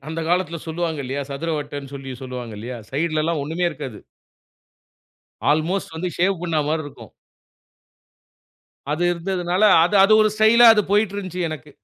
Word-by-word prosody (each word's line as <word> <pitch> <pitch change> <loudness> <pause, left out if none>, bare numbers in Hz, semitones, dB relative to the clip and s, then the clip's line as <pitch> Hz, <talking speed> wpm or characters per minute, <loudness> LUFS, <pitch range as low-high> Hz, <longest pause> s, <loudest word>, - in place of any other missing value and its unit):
அந்த 160 +1 -4
காலத்துல 175 -2 0
சொல்வாங்க 160 -1 -3
இல்லையா, 135 +3 -3
சதுர 150 +4 -3
வட்டன்னு 145 -1 -7
சொல்லி 135 -1 -8
சொல்வாங்க 125 -3 -7
இல்லையா, 120 +3 -6
சைட்லலாம் 155 +2 -1
ஒண்ணுமே 165 +5 -2
இருக்காது. 135 -9 -7 1.5
ஆல்மோஸ்ட் 160 +3 -1
வந்து 180 +3 -2
ஷேவ் 185 0 +1
பண்ண 165 -3 -1
மாரி 155 +1 0
இருக்கும். 145 - -12 1.8
அது 165 +3 -2
இருந்ததுனால 180 +2 -2 0.2
அது 205 - -1
அது 215 - +4
ஒரு 215 - +3
ஸ்டைல்லா 225 +2 +6
அது 210 - +2
போயிட்டுருந்துச்சு 200 -4 0
எனக்கு. 150 -1 -8
165 Hz, 135 wpm, -21 LUFS, 145-185 Hz, 1.8 s, ஸ்டைல்லா